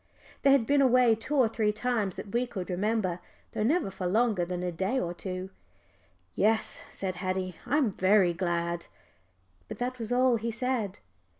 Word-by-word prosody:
They 275 - +5
had 270 -4 +4
been 285 +3 +3
away 250 -3 +5
two 225 +7 -3
or 260 -5 +5
three 220 -1 0
times 215 -3 -1
that 200 - -8
we 245 +1 +1
could 190 -5 -5
remember, 190 -1 0 0.3
though - - -3
never 255 - +1
for 185 -1 -3
longer 215 -1 +2
than 180 +1 -3
a 180 - -1
day 190 +10 -1
or 175 -5 -2
two. 185 +1 -5 0.8
"Yes," 220 +2 +1
said 185 -2 -4
Haddie, 185 -1 -3
"I'm 275 -3 +2
very 190 -1 +3
glad." 170 -1 -2 0.8
But - - -7
that 250 +1 -3
was 225 0 -5
all 250 -1 +4
he 230 +1 -3
said. 230 -4 -2
215 Hz, 175 wpm, -29 LUFS, 185-245 Hz, 0.8 s, They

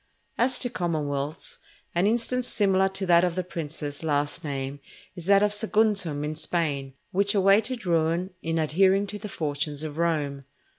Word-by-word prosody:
As 250 +2 +4
to 245 - -1
commonwealths, 150 -3 -3 0.3
an 175 +3 +2
instance 240 +2 +1
similar 195 -4 +2
to 190 0 -3
that 170 -1 +5
of 175 -2 0
the 185 - -1
princes 150 -4 -5
last 145 +2 0
named, 140 -1 -4 0.4
is 175 -2 -7
that 200 0 +6
of 210 0 +2
Saguntum 210 -8 +2
in 150 +1 -2
Spain, 145 -4 -2 0.2
which 200 +2 +2
awaited 205 +4 +3
ruin 170 +2 +1
in 165 0 -1
adhering 190 +5 +3
to 205 +1 -6
the 210 - -7
fortunes 150 -2 -3
of 155 0 -6
Rome. 150 -5 0
170 Hz, 160 wpm, -26 LUFS, 150-200 Hz, 0.4 s, that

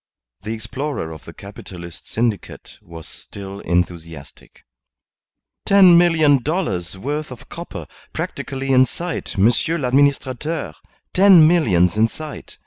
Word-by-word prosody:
The 105 +4 -5
explorer 130 - -5
of 80 -2 -11
the - - -10
Capitalist 85 -2 -11
syndicate 110 -5 -3
was 80 -2 -11
still 100 -1 -10
enthusiastic. 85 -5 -4 1.0
"Ten 190 -3 +6
million 160 -5 +4
dollars' 100 - -2
worth 150 +8 -4
of 125 -3 -12
copper - - -8 0.3
practically 135 0 -4
in 130 0 +5
sight, 170 - -6
Monsieur 120 - +2
l'Administrateur. 140 +2 0 0.4
Ten 185 -4 +7
millions 100 - +2
in 110 +1 +4
sight! 155 +4 -10
130 Hz, 115 wpm, -20 LUFS, 95-155 Hz, 1.0 s, Ten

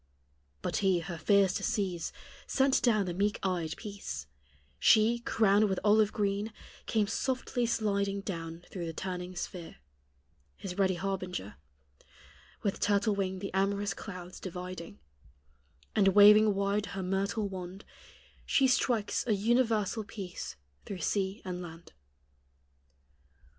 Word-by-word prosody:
But - - -1
He, 190 -4 +2
her 170 0 -6
fears 200 +1 +4
to - - -3
cease, 185 -5 -1 0.4
Sent 270 0 +3
down 215 -5 +3
the 175 - -3
meek 205 +3 0
eyed 175 -4 -1
Peace; 200 - -6 0.5
She, 225 - +5
crowned 215 -3 +3
with 190 - 0
olive 210 0 +4
green, 205 +1 -1 0.4
came 215 -2 +2
softly 250 +2 -1
sliding 200 -3 0
Down 165 -3 -6
through 175 -3 -4
the 165 - -4
turning 180 -1 -5
sphere, 175 -1 -6 0.8
His 185 0 -6
ready 190 -1 +3
harbinger, 180 - -3 1.1
With 200 - -1
turtle 205 +1 +2
wing 190 -1 -1
the 195 0 -6
amorous 200 +1 +1
clouds 180 -2 -8
dividing; 180 - -7 1.0
And 195 - +4
waving 210 0 +8
wide 200 +1 0
her 190 - -2
myrtle 200 +3 -1
wand, 185 0 -7 0.6
She 270 - +3
strikes 245 -4 +1
a 220 - +3
universal 225 0 +1
peace 195 - -7 0.3
through 190 -3 -6
sea 195 +5 -1
and 180 -1 -4
land. 165 -1 -10
200 Hz, 125 wpm, -31 LUFS, 185-210 Hz, 1.1 s, waving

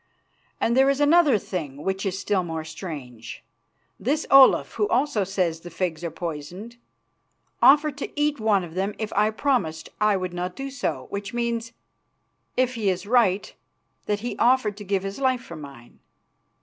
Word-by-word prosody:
And 235 - +1
there 265 +1 +5
is 275 0 +1
another 295 -3 +5
thing 150 -8 -5
which 190 +1 -2
is 190 0 -2
still 200 -1 0
more 160 -2 -4
strange. 145 - -8 0.6
This 295 +6 0
Olaf, 270 -1 +7
who 415 - 0
also 255 - +1
says 180 -4 -1
the 175 - -10
figs 170 -1 -3
are 170 - -2
poisoned, 175 +8 -7 0.8
offered 295 0 +5
to - - -5
eat 295 -1 +1
one 210 -4 +2
of 165 -2 -9
them 195 +3 -2
if 220 -1 -4
I 210 +2 +3
promised 220 - -1
I 210 -2 +4
would 185 -1 -4
not 180 +1 -4
do 275 0 -5
so, 275 - -3
which 200 +3 -5
means, 235 -1 -2 0.8
if 255 0 +2
he 220 -5 0
is 185 +1 -2
right, 210 -4 +2 0.5
that 205 -1 -1
he 240 - -4
offered 240 -4 +3
to 210 - -8
give 195 -1 -1
his 195 +5 -5
life 260 -2 +1
for 170 - -9
mine. 140 -6 -12
205 Hz, 175 wpm, -24 LUFS, 175-250 Hz, 0.8 s, Olaf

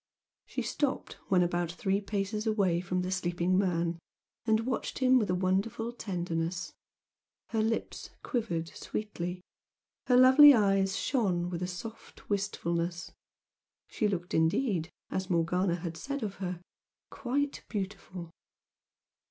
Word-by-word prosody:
She - - -3
stopped 285 -3 -1
when 180 -2 +4
about 175 -1 0
three 195 +3 0
paces 210 +2 -2
away 195 -6 +2
from 180 0 -1
the 185 - -3
sleeping 180 -1 0
man 170 -3 +1 0.5
and 220 0 +4
watched 255 -2 -2
him 260 -1 +5
with 210 -4 -1
a 180 - +2
wonderful 195 +5 0
tenderness. 175 -5 -3 0.8
Her 225 -2 +1
lips 225 +1 -2
quivered 195 - -1
sweetly 180 -4 -5 0.7
her 250 - +5
lovely 265 +3 +9
eyes 195 -3 +2
shone 180 -9 0
with 170 -1 -3
a 180 - -1
soft 215 +4 -9
wistfulness, 175 -3 -1 0.8
she 215 - 0
looked 180 -3 -3
indeed, 165 +1 +1 0.2
as 190 0 -2
Morgana 175 +1 +2
had 170 -1 -5
said 280 - -4
of 200 -2 -4
her, 180 -2 -4 0.5
"quite 280 +2 -2
beautiful." 190 -4 -5
190 Hz, 125 wpm, -30 LUFS, 175-220 Hz, 0.8 s, lovely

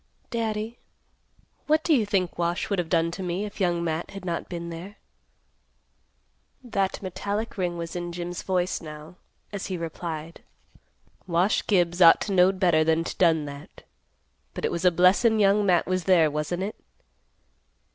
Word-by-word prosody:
"Daddy, 225 0 -3 0.9
what 310 +1 +3
do 325 - +3
you 230 -7 +2
think 185 -4 -1
Wash 170 +4 -1
would 200 - +1
have 170 -2 -2
done 170 -1 +2
to 190 - -6
me, 180 +3 -2
if 205 0 -8
Young 175 -2 +1
Matt 165 0 -2
had 195 -2 -9
not 170 -2 -3
been 170 -1 -5
there?" 180 +5 -8 1.7
That 200 -5 -2
metallic 205 +4 -3
ring 180 -3 -2
was 170 0 -6
in 175 0 -4
Jim's 175 0 -5
voice, 185 -1 -1
now, 155 +2 -10 0.4
as 200 - -4
he 185 - -3
replied, 165 -1 -6 0.9
"Wash 175 +4 +1
Gibbs 175 -3 +2
ought 165 -1 +8
to 210 - -3
knowed 185 +1 +4
better 170 -4 +4
than 160 +1 +2
to - - -5
done 160 -4 +3
that. 140 0 -10 0.7
But - - -3
it - - 0
was 170 +2 -3
a - - +8
blessin' 185 +6 +4
Young 205 0 +3
Matt 175 -2 +3
was 185 -1 -1
there, 170 -5 +4
wasn't 150 +5 -2
it? 205 - -5
180 Hz, 165 wpm, -26 LUFS, 170-195 Hz, 1.7 s, ought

